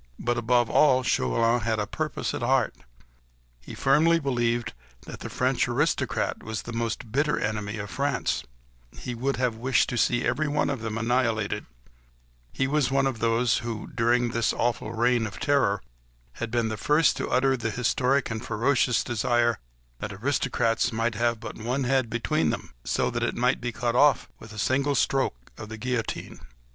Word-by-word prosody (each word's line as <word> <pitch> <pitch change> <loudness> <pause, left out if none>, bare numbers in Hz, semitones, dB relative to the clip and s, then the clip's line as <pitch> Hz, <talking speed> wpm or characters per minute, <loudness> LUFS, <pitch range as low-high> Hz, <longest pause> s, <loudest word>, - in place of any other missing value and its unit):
But, 120 0 -1
above 120 0 +2
all, 130 +1 +4
Chauvelin 115 - +2
had 110 -1 -1
a 105 - -1
purpose 155 +7 -3
at - - -4
heart. 125 -1 +2 0.9
He - - -10
firmly 160 +5 +4
believed 120 -4 0 0.3
that - - -8
the - - -6
French - - +1
aristocrat - - 0
was 110 -1 -5
the 120 - -7
most 115 0 -3
bitter 150 +4 +1
enemy 105 0 -2
of 100 -1 -6
France; 140 +3 -1 0.5
he 125 - -5
would 130 +4 -1
have 125 -2 0
wished 125 +2 +2
to 120 - -1
see 120 +2 +2
every 155 0 0
one 145 0 +1
of 135 -5 -4
them 110 -1 -3
annihilated: 115 -3 0 0.8
he 135 - 0
was 140 -2 +1
one 135 0 +2
of 130 -4 -1
those 115 +1 +2
who, 115 -3 -5
during 120 +1 +2
this 115 0 0
awful 115 -2 -1
Reign 120 0 +2
of 95 -7 -9
Terror, 125 -9 +2 0.6
had 120 - -2
been 115 -1 0
the 110 - -4
first 150 +8 +3
to - - -3
utter 135 +1 +3
the 115 -3 -2
historic 125 +3 +1
and 110 +1 -4
ferocious 125 +2 +1
desire 120 -1 +1 0.4
"that 105 - -4
aristocrats 120 0 0
might 115 +1 0
have 115 +1 0
but - - -8
one 125 +5 -1
head 130 -2 +1
between 135 +7 0
them, - - -4
so - - 0
that - - -2
it - - -1
might 125 +2 +1
be 120 0 -2
cut 120 0 -2
off 145 +2 +4
with 110 -1 -12
a 105 - -10
single 140 +6 +1
stroke 95 - 0
of 110 - -8
the 110 - -7
guillotine." 125 0 -3
120 Hz, 180 wpm, -26 LUFS, 110-130 Hz, 0.9 s, all